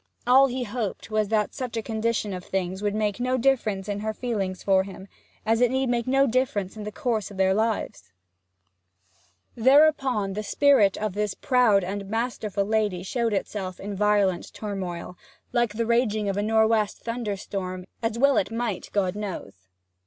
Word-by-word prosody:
All 265 +3 +6
he 255 0 -3
hoped 220 -1 -4
was 215 -1 +1
that 215 0 0
such 250 -4 -4
a 225 - -2
condition 220 -2 -1
of 180 -1 -6
things 190 0 -3
would 205 0 -1
make 210 0 -1
no 255 +1 +1
difference 225 -7 +1
in 205 -1 -2
her 215 +1 -3
feelings 200 -7 -3
for 190 -1 +4
him, 190 0 -9 0.4
as 225 +2 +2
it 245 - +5
need 265 0 0
make 240 -1 0
no 270 +1 +4
difference 240 -6 0
in 215 -1 -7
the 210 - -4
course 230 -6 -2
of 200 - -11
their 190 0 +3
lives. 220 - -2 1.4
Thereupon 265 -5 +3
the 210 - -3
spirit 220 -4 +4
of 215 -3 -2
this 210 0 -2
proud 245 -7 +3
and 195 +2 -4
masterful 220 -3 -1
lady 210 -4 0
showed 230 +3 -1
itself 190 -2 -3
in 200 0 -5
violent 200 -3 +1
turmoil, 180 -4 -5 0.3
like 240 -3 +1
the 230 +1 0
raging 220 -3 +1
of 195 - 0
a 205 - 0
nor' 220 +1 +3
west 220 -2 0
thunderstorm 200 -5 -4 0.2
as 225 0 -1
well 280 +2 +4
it - - +1
might, 230 -4 -3
God 195 -2 +1
knows. 100 - -7
215 Hz, 175 wpm, -25 LUFS, 195-235 Hz, 1.4 s, All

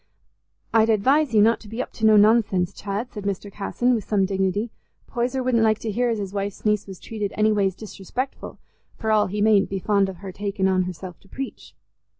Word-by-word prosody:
"I'd 225 0 +4
advise 260 +7 +3
you 215 -2 +5
not 230 +1 +3
to 215 - -14
be 225 +3 -7
up - - -3
to 220 - +1
no 215 -1 +7
nonsense, 205 -4 +3
Chad," 205 +5 -5
said 210 -3 -6
Mr. 200 0 -3
Casson, 240 +5 0
with 225 -3 -1
some 200 -1 +1
dignity; 195 +3 -1 0.3
"Poyser 250 +2 -2
wouldn't 250 -2 +2
like 215 -1 +3
to 225 - -4
hear 245 +4 +1
as 230 - 0
his 200 -2 -5
wife's 200 +1 -4
niece 210 -1 +1
was 190 -2 -9
treated 210 -3 -4
any 215 0 +3
ways 195 -3 +1
disrespectful, 220 +6 -6 0.4
for 220 - -1
all 215 -1 +3
he 205 +2 -1
mayn't 210 -2 +4
be 195 - -2
fond 200 0 +1
of 190 - -8
her 190 - -5
taking 200 0 -1
on 185 -1 +2
herself 180 -1 -7
to - - -23
preach." 270 +5 -7
210 Hz, 215 wpm, -23 LUFS, 195-225 Hz, 0.4 s, no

